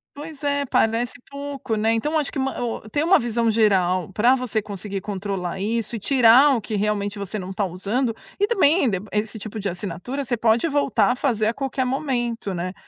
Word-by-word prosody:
Pois 295 0 -9
é, 285 0 +1
parece 230 +1 +1
pouco, 280 -4 -4
né. 220 +1 +1
Então 300 +8 +1
acho 295 - -2
que - - -6
ma 270 0 -1
o 230 -2 -4
ter 290 +8 -1
uma 360 +4 +5
visão 235 0 0
geral 190 -5 +2
pra 240 +6 +4
você 245 -4 -1
conseguir 200 -1 -6
controlar 195 -2 -4
isso 225 +3 -2
e - - -4
tirar 260 +4 +6
o 235 - -2
que 215 - -4
realmente 205 0 -1
você 200 +1 -4
não 185 0 -6
tá 200 +1 -1
usando. 210 +7 -1 0.2
E 405 - +4
também, 365 - +3
dep 200 -1 -2
esse 210 +1 -2
tipo 215 +1 -6
de 200 -1 -2
assinatura, 190 +9 -4
você 240 -2 -1
pode 225 +5 +2
voltar 285 -3 +2
a - - -6
fazer 235 -5 0
a 225 - +1
qualquer 270 0 -2
momento, 245 -5 -2
né. 180 +1 -3
225 Hz, 205 wpm, -23 LUFS, 205-270 Hz, 0.2 s, tirar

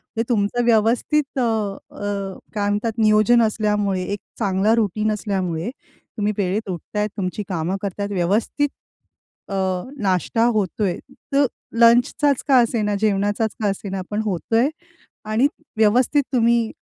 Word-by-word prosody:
म्हणजे 225 - +1
तुमचं 225 +1 +1
व्यवस्थित 240 +6 +2
अ, - - +2
अ, 205 -3 -3 0.2
काय 205 -2 0
म्हणतात 210 +3 0
नियोजन 215 +2 +4
असल्यामुळे 210 -3 0
एक 200 +2 -3 0.2
चांगला 200 0 +2
रुटिन 215 -1 0
असल्यामुळे, 190 -4 -2 0.5
तुम्ही 210 0 0
वेळेत 200 +2 -1
उठत 180 +3 -6
आहेत 210 0 +1
तुमची 195 +1 -3
कामं 175 0 -1
करत 200 -1 -5
आहेत 200 0 -2
व्यवस्थित 205 +10 0 0.8
अ, - - -3 0.5
नाष्टा 195 +4 +1
होतोय. 200 -2 0 0.3
तर 280 0 +4 0.3
लंचचाच 245 +4 +4
का 270 - +6
असेना 220 -3 0
जेवणाचाच 205 +1 +1
का 210 - +2
असेना 195 -1 -3
पण 210 0 -1
होतय 225 +6 +1 0.6
आणि 225 +6 +3 0.3
व्यवस्थित 245 +7 +3
तुम्ही 235 -2 +3
210 Hz, 130 wpm, -21 LUFS, 200-230 Hz, 0.8 s, का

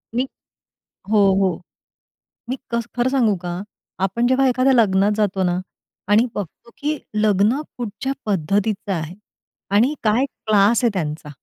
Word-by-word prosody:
मी 255 +2 +1 0.8
हो, 215 - +4 0.2
हो. 185 -4 +1 0.9
मी 255 - -2
कस 235 -1 -1
खरं 245 +1 +2
सांगू 240 -6 +3
का? 175 +1 -3 0.4
आपण 195 +6 0
जेव्हा 260 +2 +3
एखाद्या 255 +2 +3
लग्नात 205 -4 +3
जातो 200 -3 0
ना 175 +1 -1 0.5
आणि 220 +4 +5
बघतो 205 +4 -7
की 300 +1 -1 0.2
लग्न 215 +4 +2 0.2
कुठच्या 240 +3 -3
पद्धतीचं 200 +2 0
आहे 165 -1 -3 0.6
आणि 245 +8 +4
काय 220 +5 +3 0.2
क्लास 215 +2 +4
आहे 235 - +4
त्यांचा. 155 -4 -3
215 Hz, 135 wpm, -21 LUFS, 195-240 Hz, 0.9 s, आणि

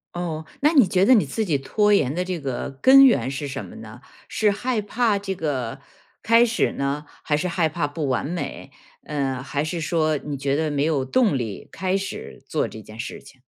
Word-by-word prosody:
哦， 165 -3 -4 0.2
那 300 +3 +4
你 265 - +6
觉 185 +1 +3
得 260 - +6
你 220 - +5
自 220 - -2
己 155 -7 +1
拖 210 +10 +2
延 140 -9 +2
的 180 +3 -2
这 180 -2 -3
个 135 -4 -4
根 275 +1 +8
源 235 - +3
是 140 +2 -4
什 140 0 -5
么 - - -11
呢？ 110 +2 -11 0.3
是 215 - +1
害 225 +3 -1
怕 210 0 +1
这 195 -1 -4
个 135 -9 -3 0.4
开 230 +1 +5
始 230 -1 +1
呢， 140 +2 -2 0.2
还 150 - +1
是 180 - -1
害 170 -2 +1
怕 155 0 -2
不 145 0 -4
完 130 -1 0
美， 170 +4 -5 0.3
呃， 135 -3 -2
还 140 +2 -2
是 165 +2 -3
说 155 -1 +1
你 145 0 -5
觉 140 0 -1
得 155 0 0
没 140 -1 0
有 150 -4 +1
动 210 - +2
力 110 -6 -5
开 190 0 -1
始 195 0 -5
做 - - 0
这 110 - -10
件 110 +1 -13
事 115 - -6
情。 135 -1 -18
155 Hz, 230 characters per minute, -23 LUFS, 140-200 Hz, 0.4 s, 根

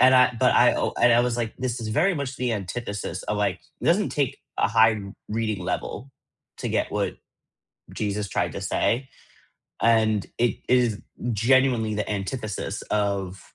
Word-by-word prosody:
and 130 +1 +7
I 130 0 +6
but - - +4
I - - +6 0.3
and 120 0 +6
I 120 - +5
was 120 -1 0
like, 115 -2 -2
this 125 -1 -3
is 110 - -4
very 180 - +2
much 140 -3 -4
the 125 -2 -1
antithesis 105 +1 -4
of, 105 - -2
like, 100 -3 0 0.2
it - - -7
doesn't 200 +5 +3
take 145 -4 -1 0.2
a - - +4
high 110 +1 +5
r 100 -2 -7 0.2
reading 110 -1 -2
level 135 - -4 0.5
to - - -3
get - - 0
what - - -1 0.8
Jesus 105 -1 -2
tried - - -1
to - - -5
say, 130 +3 0 0.7
and 110 -3 +3
it 120 0 +2
is 120 -4 +3 0.3
genuinely 120 0 +3
the 105 - -2
antithesis 105 +1 -3
of 100 -2 -1
115 Hz, 170 wpm, -25 LUFS, 105-125 Hz, 0.8 s, and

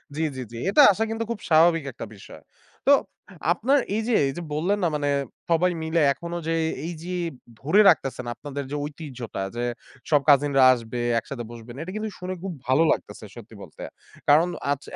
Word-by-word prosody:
জ্বী, 160 - -1
জ্বী, 130 - -4
জ্বী। 115 - -8
এটা 290 +9 +6
আসা 210 +3 -1
কিন্তু 225 0 -2
খুব 220 - -4
স্বাভাবিক 165 0 +5
একটা 115 - -8
বিষয়। 95 - -13 0.5
তো, - - +7 0.6
আপনার 265 +10 +2 0.2
এই 220 - 0
যে, 245 - +1
এই 135 - -1
যে - - -4
বললেন 180 +7 0
না 175 - +4
মানে 145 -1 -1 0.4
সবাই 175 +2 +3
মিলে 160 +1 +1
এখনো 170 +5 -6
যে, 165 - +1 0.3
এই 170 - -3
যে 180 - -5 0.5
ধরে 185 +10 +4
রাখতেছেন 135 -7 0
আপনাদের 145 -1 -6
যে - - -2
ঐতিহ্যটা, 130 - -6
যে 120 - -2 0.5
সব 145 -3 +4
কাজিনরা 140 -1 +5
আসবে, 120 0 -5 0.2
একসাথে 120 0 -7
বসবেন, 120 0 -10
এটা 180 - -6
কিন্তু 215 0 -3
শুনে 180 +1 -4
খুব 195 - -4
ভালো 135 +5 +4
লাগতেছে - - -4
সত্যি - - -12
বলতে। - - -13 0.5
কারণ 155 +4 +5 0.2
আজ 145 0 -1
155 Hz, 185 wpm, -24 LUFS, 135-180 Hz, 0.6 s, তো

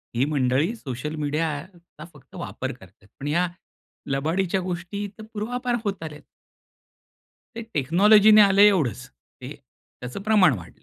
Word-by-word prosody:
ही 125 +3 +2
मंडळी 145 - 0
सोशल 150 - -6
मीडियाचा 155 +2 -4
फक्त 145 -4 -18
वापर - - -5
करतात, 95 +2 -19
पण 140 - -5
या 170 +5 +1 0.6
लबाडीच्या 170 +7 0
गोष्टी 185 +3 -5
तर 220 - -10
पूर्वापार 245 +3 -2
होत 200 -5 -3
आल्यात. 150 -2 -8 1.4
हे 230 - -4
टेक्नॉलॉजी 200 +9 +5
ने 215 - +8
आलं 200 -1 +5
आहे 205 - +9
एवढंच. 135 - 0 0.3
ते 125 - -8 0.5
त्याच 125 0 -8
प्रमाण 210 -7 +5
वाढलंय. 85 -2 -15
165 Hz, 140 wpm, -24 LUFS, 140-205 Hz, 1.4 s, आहे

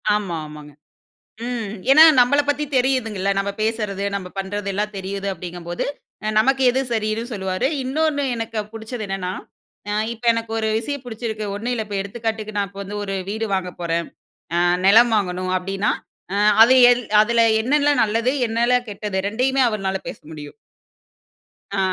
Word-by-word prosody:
ஆமா, 200 -5 -2
ஆமாங்க. 150 -1 -11 0.8
ம் 230 -5 -3 0.2
ஏன்னா, 310 +4 +9 0.2
நம்மள 250 +4 +4
பத்தி 290 +1 +1
தெரியுதுங்கல்ல 225 -7 +1
நம்ம 200 0 -1
பேசுறது 210 -3 -2
நம்ம 190 -2 -4
பண்ணுறது 200 +1 -3
எல்லா 205 +2 0
தெரியுது 195 +1 -4
அப்படிங்கும்போது 175 -1 -5 0.5
நமக்கு 265 +4 +3
எது 260 +2 0
சரின்னு 215 0 -1
சொல்லுவாரு. 190 +2 -1 0.2
இன்னொன்னு 290 +2 0
எனக்கு 225 -1 -4
புடிச்சது 225 +1 -6
என்னன்னா, 195 -2 -3 0.6
அ - - -1 0.2
இப்போ 235 +1 -8
எனக்கு 230 -1 -4
ஒரு 220 0 0
விஷயம் 285 +4 -4
பிடிச்சிருக்கு. 220 -2 -5
ஒண்ணும் 230 +5 -3
இல்ல 220 -2 -2
இப்போ 205 -1 -4
எடுத்துக்காட்டுக்கு 215 +1 -4
நான் 200 -1 0
இப்போ 200 +1 -9
வந்து 205 +2 -6
ஒரு 195 -1 -3
வீடு 220 +2 -2
வாங்கப் 180 -2 -3
போறேன். 170 0 -1 0.5
அ - - +3 0.3
நிலம் 225 +4 +6
வாங்கணும் 185 -2 -2
அப்படின்னா 195 +3 -1 0.4
அ - - 0 0.3
அது 245 +3 +5 0.2
எல் 245 0 +1 0.2
அதில 235 +2 +2 0.2
என்னனலாம் 285 +2 +2
நல்லது 225 +3 +1 0.2
என்னலாம் 240 +2 +1
கெட்டது 205 -1 -3
2யுமே 255 +5 +1
அவர்னால 195 -3 -2
பேச - - -7
முடியும். 150 -2 -9 1.2
ஆ - - +1
215 Hz, 155 wpm, -21 LUFS, 195-240 Hz, 1.2 s, ஏன்னா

